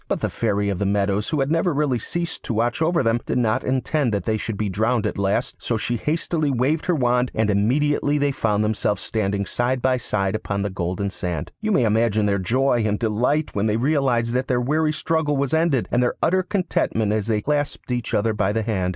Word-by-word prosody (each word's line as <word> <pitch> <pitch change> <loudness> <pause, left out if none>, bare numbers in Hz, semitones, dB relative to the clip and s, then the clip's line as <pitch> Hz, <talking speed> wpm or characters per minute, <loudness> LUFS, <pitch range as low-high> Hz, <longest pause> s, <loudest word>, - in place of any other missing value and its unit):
But - - -2
the - - -1
Fairy 100 0 0
of 95 -3 -2
the 100 - 0
Meadows, 100 +1 0
who 150 - 0
had 135 +2 0
really 165 0 +1
never 140 -5 +1
ceased 170 +8 -4
to 115 - -2
watch 120 +5 0
over 165 -2 +2
them, 115 0 +2
did - - 0
not 115 -2 +1
intend 130 +1 0
that 100 -3 -3
they 110 - +1
should 110 -1 -4
be 105 - -1
drowned 110 +4 0
at 105 - -2
last, 100 +5 0
so 115 - -1
she 120 +2 -2
hastily 155 +3 -1
waved 140 +5 0
her 180 - +2
wand, 125 -2 +2
and 110 -1 +2
immediately 145 +8 +1
they 145 -1 +1
found 105 -5 0
themselves 105 -1 -1
standing 100 -2 -1
side 125 +4 -1
by 130 +1 +2
side 100 -5 -1
upon 100 -2 -2
the 100 - -2
golden 95 +2 -2
sand. 90 -6 -4
You 215 0 -1
may 135 - +3
imagine 110 -1 +2
their 100 -1 +1
joy 120 +5 +1
and 105 -1 0
delight 120 +8 0
when 105 +2 0
they 105 0 +1
realised 125 -3 +1
that 130 +1 0
their 125 -1 +1
weary 155 +5 +1
struggle 155 -1 0
was 140 0 -1
ended, 160 -6 +2
and 120 - +2
their 125 - +1
utter 185 +3 +3
contentment 175 - 0
as 110 -1 -1
they 105 -2 0
clasped 145 -3 -2
each 120 -2 -2
other 110 +1 +1
by 105 -2 0
the 110 0 0
hand. 95 -5 -1
120 Hz, 230 wpm, -22 LUFS, 105-145 Hz, -, may